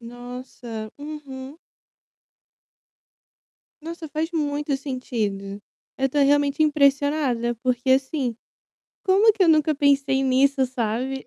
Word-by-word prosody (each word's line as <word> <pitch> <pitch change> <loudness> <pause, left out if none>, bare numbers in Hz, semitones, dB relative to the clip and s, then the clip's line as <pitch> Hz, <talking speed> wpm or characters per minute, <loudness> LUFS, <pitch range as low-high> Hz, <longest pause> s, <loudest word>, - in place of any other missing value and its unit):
Nossa, 245 -2 -8
uhum. 290 -1 -8 2.2
Nossa, 330 -1 -7
faz 315 +3 -2
muito 295 -3 -1
sentido. 215 -7 -4 0.4
Eu 270 0 +1
tô 290 - -2
realmente 285 +1 +3
impressionada, 280 -4 +2
porque, 255 0 0
assim, 265 -3 0 0.7
como 395 +4 +5
que 405 -2 0
eu 335 - +3
nunca 310 -1 +4
pensei 275 -1 +2
nisso, 270 +1 +3
sabe? 255 +2 -3
275 Hz, 100 wpm, -23 LUFS, 250-295 Hz, 2.2 s, como